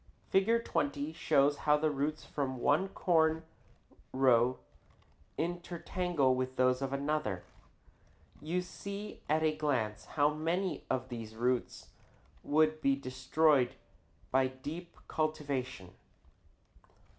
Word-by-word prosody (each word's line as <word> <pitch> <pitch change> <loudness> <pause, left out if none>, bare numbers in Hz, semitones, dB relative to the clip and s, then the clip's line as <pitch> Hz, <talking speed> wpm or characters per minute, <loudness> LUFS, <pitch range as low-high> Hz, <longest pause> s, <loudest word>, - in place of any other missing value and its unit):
Fig. 230 +5 +3
20 145 +2 -1
shows 145 -3 +3
how 150 0 +3
the 155 0 +1
roots 145 +2 -2
from 135 -3 -3
one 145 +9 +2
corn 160 -4 +2 0.7
row 130 -1 +4 0.8
intertangle 175 -3 0
with 130 0 -2
those 130 0 +3
of 135 -1 -2
another. 140 -9 -1 1.0
You 175 +4 -1
see 200 +3 -7
at 155 +1 +2
a 155 -1 +2
glance 125 -9 -1
how 145 0 +2
many 165 +2 -1
of 130 0 -1
these 115 -2 -7
roots 125 +2 -1 0.5
would 155 +1 +2
be 140 -2 +3
destroyed 135 +1 +2 0.6
by 130 0 +4
deep 150 +7 -8
cultivation. 140 - -2
145 Hz, 110 wpm, -32 LUFS, 130-160 Hz, 1.0 s, row